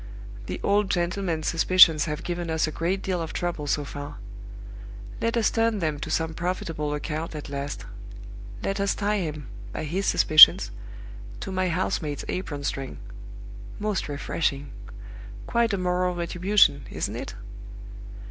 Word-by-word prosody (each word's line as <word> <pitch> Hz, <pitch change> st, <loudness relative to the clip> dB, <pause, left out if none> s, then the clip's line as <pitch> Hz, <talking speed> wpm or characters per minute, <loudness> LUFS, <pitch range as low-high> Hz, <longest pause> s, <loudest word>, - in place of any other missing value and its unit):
The -, -, -4 dB
old 205 Hz, 0 st, +2 dB
gentleman's 175 Hz, -2 st, -1 dB
suspicions 165 Hz, -2 st, +5 dB
have 150 Hz, -2 st, -4 dB
given 175 Hz, -1 st, -4 dB
us 160 Hz, -1 st, +1 dB
a 155 Hz, -, -4 dB
great 180 Hz, +5 st, -2 dB
deal 185 Hz, -3 st, -1 dB
of 165 Hz, -, -5 dB
trouble 170 Hz, -4 st, -3 dB
so 145 Hz, 0 st, 0 dB
far. 145 Hz, +1 st, -8 dB, 1.0 s
Let 230 Hz, +1 st, 0 dB
us 225 Hz, -, +2 dB
turn 225 Hz, -1 st, +1 dB
them 155 Hz, -5 st, -2 dB
to -, -, -5 dB
some 160 Hz, 0 st, -1 dB
profitable 165 Hz, -3 st, -3 dB
account 155 Hz, +2 st, -4 dB
at 150 Hz, -1 st, -7 dB
last; 140 Hz, 0 st, -5 dB, 0.8 s
let 195 Hz, +1 st, -2 dB
us 200 Hz, 0 st, +1 dB
tie 210 Hz, 0 st, 0 dB
him, 150 Hz, -6 st, -5 dB, 0.2 s
by -, -, -5 dB
his 180 Hz, +6 st, -2 dB
suspicions, 105 Hz, -10 st, +8 dB, 0.7 s
to 195 Hz, -, -5 dB
my 185 Hz, -1 st, 0 dB
house 180 Hz, +2 st, -1 dB
maid's 145 Hz, -3 st, -5 dB
apron 145 Hz, -6 st, -4 dB
string. 135 Hz, -1 st, -4 dB, 0.8 s
Most 210 Hz, -6 st, -2 dB
refreshing. 145 Hz, -1 st, -2 dB, 0.7 s
Quite 235 Hz, -1 st, +1 dB
a 200 Hz, -, 0 dB
moral 180 Hz, 0 st, 0 dB
retribution, 175 Hz, -4 st, +2 dB
isn't -, -, -4 dB
it? -, -, -6 dB
170 Hz, 150 wpm, -25 LUFS, 150-190 Hz, 1.0 s, suspicions